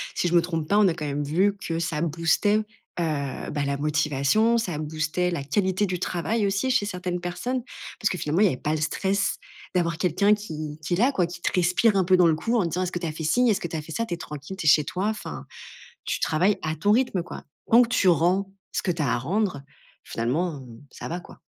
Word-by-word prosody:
si 175 - +1
je - - -3
me 170 - +6
trompe 165 -3 -3
pas, 205 - +4
on 210 - +6
a 175 - +2
quand 155 - -5
même 145 0 -2
vu 190 +7 +2
que 165 -3 -3
ça 165 -2 -2
boostait, 170 +6 +2
heu, - - -2 0.3
bah, 145 -3 -2
la 140 0 0
motivation, 150 +9 +2
ça 180 -9 -2
boostait 155 +3 -1
la 145 -5 -3
qualité 190 +7 +1
du 180 -2 -3
travail, 200 +5 -1
aussi, 200 +7 0
chez 205 -5 +2
certaines 180 -2 -3
personnes. 240 +9 -3 0.4
Parce 215 - +2
que 180 - -3
finalement, 155 +3 -1
il - - +7
y - - +6
avait 140 - 0
pas 150 - -1
le - - -2
stress 195 +5 0 0.4
d'avoir 170 -2 +1
quelqu'un 185 +4 +3
qui 155 -7 -5
qui 150 - -2
est - - +2
là, 245 +7 +4
quoi, 185 -10 +1
qui 175 0 -9
te - - 0
respire 185 +4 +3
un 190 - +3
peu 185 +1 +5
dans 180 -2 +5
le 160 - +3
cou 230 +9 -1
en 210 - +3
te 170 - -1
disant: 180 +3 -1
«Est-ce 180 - -3
que 175 - -2
tu 170 - -3
as - - -2
fait 160 +1 -6
ci? 245 +11 +2
Est-ce 205 - +2
que 170 - -4
tu 165 - -6
as 155 - -2
fait 160 - -11
ça?» 230 - -1
Tu 180 - -4
es - - -3
tranquille, 150 +2 -8
tu 190 - -6
es - - +6
chez 150 -1 +5
toi, 185 +7 -2
enfin. 75 - -6 0.6
Tu - - -1
travailles 180 +6 +2
à 155 0 -1
ton 205 +6 +2
rythme, 235 -5 +2
quoi. 175 - -9 0.3
Tant 235 +2 +8
que 235 - -4
tu 240 -6 +2
rends 180 +4 +2 0.2
ce - - 0
que 180 - +1
tu 165 - -3
as 145 - +1
à - - +2
rendre, 180 - -1 0.4
finalement, 140 +5 -2 0.3
ça - - -7
va, 175 - -3
quoi. - - -15
175 Hz, 260 wpm, -25 LUFS, 155-200 Hz, 0.6 s, Tant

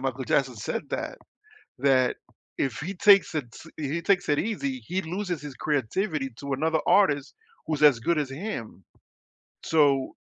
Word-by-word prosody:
Michael 130 0 -3
Jackson 130 -2 +1
said 105 - -3
that. - - -4 0.6
That 130 -2 +3 0.4
if 130 -5 -1
he 180 +6 -4
takes 200 -1 +5
it 150 -5 -2
s - - -13
he 155 +3 -3
takes 185 -3 +2
it 145 - +2
easy, 260 +4 -2
he 185 +3 -1
loses 180 0 -3
his 145 -2 -7
creativity 150 - -1
to 140 -1 -4
another 160 +3 +1
artist 145 -9 +3 0.3
who's 155 -2 -2
as 145 -5 +7
good 160 +8 0
as 145 -3 -2
him. 135 - -6 0.8
So, 140 -4 +2
150 Hz, 160 wpm, -26 LUFS, 135-180 Hz, 0.8 s, as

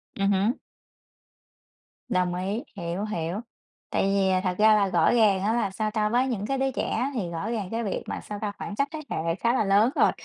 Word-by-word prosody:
Ừm 195 0 +1
hứm. 200 +4 +2 1.6
Đồng 180 -1 +1
ý, 195 +6 -2
hiểu, 175 +4 -3
hiểu. 175 -2 -3 0.5
Tại - - +1
vì 195 0 +2
thật 180 -1 -1
ra 215 0 +6
là 200 -2 +3
rõ 175 -3 +3
ràng 210 -5 +4
á, 215 - +2
là 230 -4 +1
sao 215 +2 -2
ta? 210 -1 +1
Với 245 +4 +2
những 215 -6 -2
cái 270 +4 -1
đứa 270 0 +1
trẻ 265 +1 -1
thì 205 -9 -2
rõ 170 +6 -4
ràng 210 -6 -3
cái 230 +1 -1
việc 200 - -3
mà, - - -4
sao 205 -1 -7
ta? 210 -2 -1
Khoảng 205 - -6
trách 280 +5 +1
thế 315 - -5
hệ 165 +1 -1
khá 235 +5 +1
là 255 - +2
lớn 200 +4 +4
rồi, - - +4
205 Hz, 220 wpm, -26 LUFS, 190-230 Hz, 1.6 s, ra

